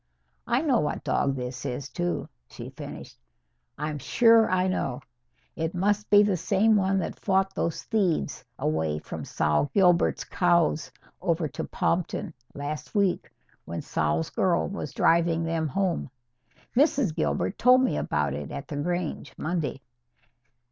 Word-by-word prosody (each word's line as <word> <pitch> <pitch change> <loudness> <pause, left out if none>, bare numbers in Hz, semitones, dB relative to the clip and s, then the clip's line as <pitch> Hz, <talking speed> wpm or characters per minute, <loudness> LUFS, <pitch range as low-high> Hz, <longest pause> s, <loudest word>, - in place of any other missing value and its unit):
"I 240 +2 +2
know 265 -7 +3
what 150 - -2
dog 135 -1 +1
this 125 -1 -5
is, 125 +2 -4
too," 175 +3 -2 0.2
she - - -9
finished. - - -9 0.6
"I'm 150 0 -3
sure 230 - +5
I 185 0 +2
know. 140 -8 -2 0.5
It 165 +2 -3
must 205 +3 0
be 205 0 +7
the 200 -3 +1
same 215 +5 +3
one 195 -1 +2
that 190 - -3
fought 195 -1 +1
those 165 -4 -2
thieves 195 -8 0
away 80 -1 0
from - - -7
Sol 75 - 0
Gilbert's 180 -3 +4
cows 170 -4 +1 0.3
over 170 -3 0
to - - -5
Pompton, 170 -1 -1 0.2
last 145 +7 -5
week, 200 -3 +1 0.4
when 85 0 -5
Sol's 80 - -1
girl 180 -3 +1
was 195 -7 -5
driving 165 0 +2
them 165 -1 -1
home. 180 0 -1 0.7
Mrs. 275 - +3
Gilbert 75 +5 -1
told 250 +1 +6
me 255 - +1
about 75 -2 -1
it 75 0 -5
at 140 - -6
the 145 - -4
Grange, 170 -2 -3
Monday. 155 -5 -2
170 Hz, 145 wpm, -26 LUFS, 145-195 Hz, 0.7 s, be